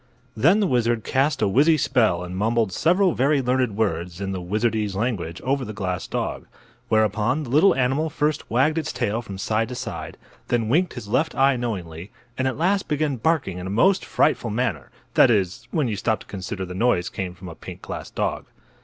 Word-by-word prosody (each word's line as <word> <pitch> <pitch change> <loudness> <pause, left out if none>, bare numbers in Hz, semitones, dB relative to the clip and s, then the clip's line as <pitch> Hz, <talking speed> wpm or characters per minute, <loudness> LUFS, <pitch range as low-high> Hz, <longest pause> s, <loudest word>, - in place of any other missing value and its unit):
Then 165 - +4
the - - +3
wizard 120 - +1
cast 140 +3 +1
a - - +3
wizzy 150 +10 +4
spell 110 -12 +2
and 90 +1 -6
mumbled 110 +1 +1
several 180 - +3
very 140 +3 +2
learned 125 -4 0
words 90 -4 -1
in 100 -1 -3
the 95 -1 -4
wizardese 105 +2 -1
language 100 -7 -2
over 135 +1 0
the 110 - -6
glass 95 -3 -3
dog. - - -3 0.4
Whereupon 110 +6 +2
the 120 - -7
little 155 +3 +5
animal 135 +5 +1
first 150 +1 -1
wagged 145 +8 +2
its 155 - -3
tail 110 +3 -1
from 100 -4 -8
side 110 +3 0
to 125 - -5
side, 130 - -6 0.3
then 115 -3 0
winked 175 +7 +2
his 105 - -8
left 150 +10 0
eye 135 0 +4
knowingly, 95 -7 -5 0.3
and 130 +1 0
at 130 - -2
last 190 +5 +1
began 150 -3 0
barking 120 - 0
in 90 - -6
a - - -4
most 185 - +3
frightful 135 -6 +1
manner—that 110 - 0
is, 105 +2 0
when 150 -1 0
you 110 - -2
stop 110 +2 -1
to - - -12
consider 95 0 -5
the 90 - -7
noise 95 -3 +1
came 90 -2 -5
from 90 0 -11
a 85 - -7
pink - - -11
glass - - -6
dog. - - -2
115 Hz, 200 wpm, -23 LUFS, 100-135 Hz, 0.4 s, little